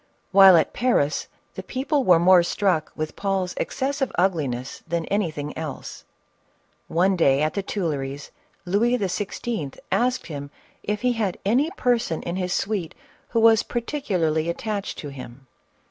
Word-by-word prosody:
While 195 Hz, -2 st, +8 dB
at 160 Hz, -, +1 dB
Paris, 205 Hz, -, +1 dB, 0.3 s
the -, -, -6 dB
people 275 Hz, +2 st, -1 dB
were 180 Hz, -7 st, +6 dB
more 180 Hz, +1 st, +6 dB
struck 175 Hz, -2 st, 0 dB
with 155 Hz, 0 st, -4 dB
Paul's 195 Hz, -2 st, -1 dB
ex -, -, -4 dB
cessive 270 Hz, 0 st, 0 dB
ugliness 140 Hz, -9 st, -1 dB
than 170 Hz, 0 st, -1 dB
anything 160 Hz, -8 st, -2 dB
else. 155 Hz, -4 st, -7 dB, 0.8 s
One 185 Hz, +3 st, +2 dB
day 140 Hz, -4 st, +3 dB
at 155 Hz, -, 0 dB
the 200 Hz, -, -1 dB
Tuilleries, 145 Hz, -8 st, -4 dB, 0.3 s
Louis 225 Hz, +7 st, +2 dB
XVI. 195 Hz, -, -3 dB
asked 250 Hz, +1 st, +1 dB
him 145 Hz, -3 st, -6 dB, 0.3 s
if 210 Hz, 0 st, -3 dB
he 250 Hz, -1 st, +2 dB
had 210 Hz, -6 st, -1 dB
any 255 Hz, +10 st, +2 dB
person 235 Hz, -10 st, 0 dB
in 175 Hz, +1 st, -3 dB
his 180 Hz, -1 st, -2 dB
suite 195 Hz, -4 st, -2 dB, 0.3 s
who 230 Hz, -, +1 dB
was 225 Hz, -1 st, +6 dB
particularly 185 Hz, -, -1 dB
attached 205 Hz, +3 st, -3 dB
to 145 Hz, -, -6 dB
him 130 Hz, -1 st, -10 dB
185 Hz, 145 wpm, -24 LUFS, 155-220 Hz, 0.8 s, While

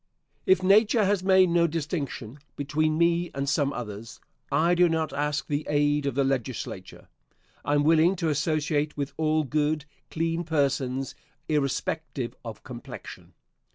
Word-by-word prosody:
If 185 Hz, 0 st, +4 dB
nature 210 Hz, +3 st, +5 dB
has 200 Hz, -1 st, +1 dB
made 190 Hz, -1 st, +5 dB
no 170 Hz, 0 st, +4 dB
distinction 150 Hz, -6 st, -4 dB, 0.2 s
between 155 Hz, +2 st, 0 dB
me 170 Hz, +1 st, +2 dB
and 140 Hz, 0 st, -2 dB
some 140 Hz, 0 st, +1 dB
others, 115 Hz, -3 st, -7 dB, 0.3 s
I 160 Hz, +5 st, +3 dB
do 175 Hz, 0 st, +4 dB
not 160 Hz, -2 st, -1 dB
ask 145 Hz, 0 st, -1 dB
the 145 Hz, +1 st, -2 dB
aid 145 Hz, 0 st, +2 dB
of 140 Hz, -, -2 dB
the 140 Hz, -, +2 dB
Legislature. 125 Hz, -8 st, -4 dB, 0.6 s
I 145 Hz, -, +1 dB
am 145 Hz, -, +3 dB
willing 165 Hz, +4 st, +4 dB
to 170 Hz, -3 st, -1 dB
associate 150 Hz, 0 st, 0 dB
with 140 Hz, -1 st, -3 dB
all 155 Hz, 0 st, +1 dB
good, 150 Hz, +1 st, 0 dB, 0.2 s
clean 165 Hz, +1 st, -1 dB
persons, 135 Hz, -4 st, -1 dB, 0.3 s
irrespective 145 Hz, -2 st, -2 dB
of 115 Hz, -2 st, -8 dB
complexion. 120 Hz, -2 st, -10 dB
150 Hz, 145 wpm, -26 LUFS, 140-165 Hz, 0.6 s, nature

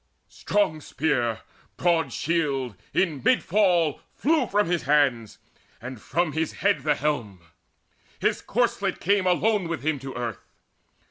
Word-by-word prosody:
Strong 160 Hz, -7 st, 0 dB
spear, 120 Hz, -7 st, -1 dB, 0.4 s
broad 170 Hz, -2 st, +1 dB
shield, 140 Hz, -8 st, -1 dB, 0.2 s
in 160 Hz, -8 st, 0 dB
mid 255 Hz, -, +3 dB
fall 175 Hz, -6 st, +2 dB
flew 300 Hz, -3 st, +2 dB
from 205 Hz, +1 st, +2 dB
his 175 Hz, 0 st, 0 dB
hands, 135 Hz, -7 st, +2 dB, 0.4 s
And 125 Hz, -1 st, -8 dB
from 170 Hz, -2 st, 0 dB
his 160 Hz, +1 st, -2 dB
head -, -, +1 dB
the 150 Hz, +1 st, +2 dB
helm: 125 Hz, -11 st, -2 dB, 0.8 s
his -, -, 0 dB
corslet -, -, 0 dB
came 200 Hz, 0 st, +2 dB
Alone 190 Hz, +1 st, +2 dB
with 165 Hz, -3 st, -4 dB
him 155 Hz, -2 st, 0 dB
to 135 Hz, 0 st, -8 dB
earth. 120 Hz, -3 st, -4 dB
155 Hz, 135 wpm, -25 LUFS, 135-180 Hz, 0.8 s, mid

